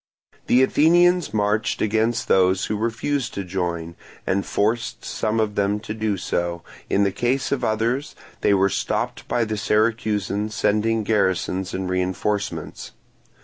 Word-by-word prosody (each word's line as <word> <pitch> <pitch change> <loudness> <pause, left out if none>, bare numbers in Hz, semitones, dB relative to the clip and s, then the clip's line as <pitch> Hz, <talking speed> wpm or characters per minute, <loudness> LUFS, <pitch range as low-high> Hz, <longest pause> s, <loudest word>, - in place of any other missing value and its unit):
The 125 +2 +5
Athenians 175 - +4
marched 105 +1 0
against 110 +2 0
those 95 0 +3
who 110 - -2
refused 115 +4 -2
to 100 - -3
join, 85 -2 -3 0.3
and 100 +1 0
forced 110 +3 -1
some 110 +1 -1
of 110 -1 0
them 100 +1 0
to 110 -1 -5
do 110 -2 -1
so; 85 -1 -2 0.3
in 100 - +3
the 100 - +2
case 125 +6 -1
of 135 -3 -1
others 115 +6 -1 0.3
they 100 - +4
were 95 0 +3
stopped 100 - -2
by 120 - +1
the 110 -1 -3
Syracusans 105 -1 0
sending 110 +1 +1
garrisons 95 -3 0
and 95 0 -3
reinforcements. 95 +3 -2
105 Hz, 145 wpm, -23 LUFS, 95-115 Hz, 0.3 s, The